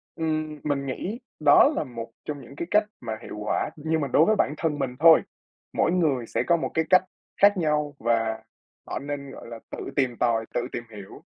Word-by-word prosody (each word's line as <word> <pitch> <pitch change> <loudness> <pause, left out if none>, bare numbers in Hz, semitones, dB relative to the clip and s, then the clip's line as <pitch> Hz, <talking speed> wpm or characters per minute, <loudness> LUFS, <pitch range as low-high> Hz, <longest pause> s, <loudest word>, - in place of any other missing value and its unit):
Ừm, 155 -2 -2
mình 140 -2 -1
nghĩ 195 - -4 0.2
đó - - +7
là - - 0
một 115 -3 -8
trong 145 -2 -5
những 135 +3 -13
cái 170 - -4
cách 210 +1 +5 0.2
mà 115 -2 -4
hiệu - - -8
quả, 105 0 -1
nhưng 160 +1 -1
mà 140 - -1
đối 150 +5 +4
với 215 - +3
bản 150 - +1
thân 150 -3 -1
mình 130 -2 -2
thôi. 165 0 +8 0.5
Mỗi - - +2
người 145 -10 +1
sẽ - - -1
có 170 -1 +4
một - - -3
cái 160 0 +1
cách 185 0 +6 0.4
khác 200 -1 +6
nhau 150 -3 0
và 115 -1 0 0.4
họ - - -3
nên, 140 -1 -6
gọi - - -11
là, 115 -1 -8
tự - - -7 0.2
tìm 130 -4 +1
tòi, 115 -2 +1
tự - - +1
tìm 120 - -4
hiểu. 100 -1 -11
145 Hz, 215 wpm, -25 LUFS, 120-160 Hz, 0.5 s, thôi